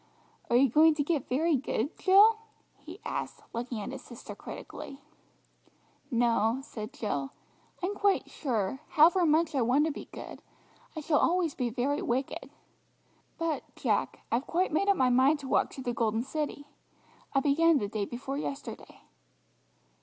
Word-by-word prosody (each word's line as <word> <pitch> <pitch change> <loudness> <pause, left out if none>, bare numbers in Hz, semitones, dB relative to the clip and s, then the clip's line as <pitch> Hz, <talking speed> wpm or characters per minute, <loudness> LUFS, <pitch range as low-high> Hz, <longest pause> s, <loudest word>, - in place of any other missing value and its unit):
"Are 235 - +2
you 265 +3 +6
going 310 +5 +5
to 295 - 0
get 295 -3 -1
very 315 +5 +2
good, 270 0 -2
Jill?" 420 +4 +6 0.4
he - - -11
asked, - - -4
looking 235 0 -4
at 205 - -5
his 270 -1 -7
sister 240 -3 -10
critically. 275 - -9 1.1
"No," 235 -1 +2
said 215 -4 -7
Jill, 140 - -3 0.5
"I'm 380 +3 0
quite 400 -1 +1
sure, 235 -4 -2
however 335 +3 +5
much 315 +1 +2
I 270 - +1
want 255 +6 +3
to 320 - 0
be - - -8
good, - - -9 0.5
I 310 - -4
shall 300 -1 +2
always 345 -3 +2
be 250 -3 -2
very 265 +5 -1
wicked. 260 +3 -2 0.9
But, 330 -3 -1
Jack, - - -1
I've 245 +4 0
quite 355 -1 0
made 395 +6 +2
up 400 - +4
my 255 -1 +3
mind 265 +5 +4
to 270 - -7
walk - - +2
to 265 - -7
the 245 -1 -2
Golden 225 -1 0
City; 290 +1 -4 0.7
I - - +6
began 310 +3 +4
the 205 - -1
day 210 0 -2
before 265 +5 -5
yesterday." 280 -1 -7
275 Hz, 160 wpm, -29 LUFS, 240-315 Hz, 1.1 s, you